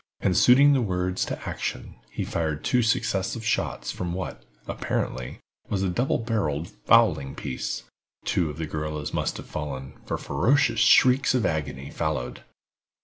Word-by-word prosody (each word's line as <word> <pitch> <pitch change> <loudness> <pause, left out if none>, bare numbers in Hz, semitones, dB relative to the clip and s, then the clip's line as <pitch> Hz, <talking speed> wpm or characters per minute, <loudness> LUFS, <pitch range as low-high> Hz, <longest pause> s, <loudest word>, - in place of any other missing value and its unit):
And 95 -2 +1
suiting 140 +8 +7
the 135 - +3
words 90 -3 -1
to - - -5
action, - - -4 0.2
he - - -4
fired 80 -2 -2
two 125 - +2
successive 110 -1 0
shots 110 - -1
from 85 -1 -4
what, 95 0 -5 0.3
apparently, 60 -1 -3 0.3
was 100 -1 0
a 95 - +1
double 120 +9 +1
barrel 100 - -1
fowling 70 -4 +2
piece. 65 -2 -4 0.4
Two 85 -3 +1
of 75 - -7
the 80 - -2
guerrillas 75 -1 -4
must - - -1
have - - -8
fallen, 65 -3 -5
for - - -3
ferocious 130 -3 +2
shrieks 130 +3 +5
of 120 -5 +1
agony 70 -5 -2
followed. 60 0 -3
90 Hz, 150 wpm, -26 LUFS, 75-115 Hz, 0.4 s, suiting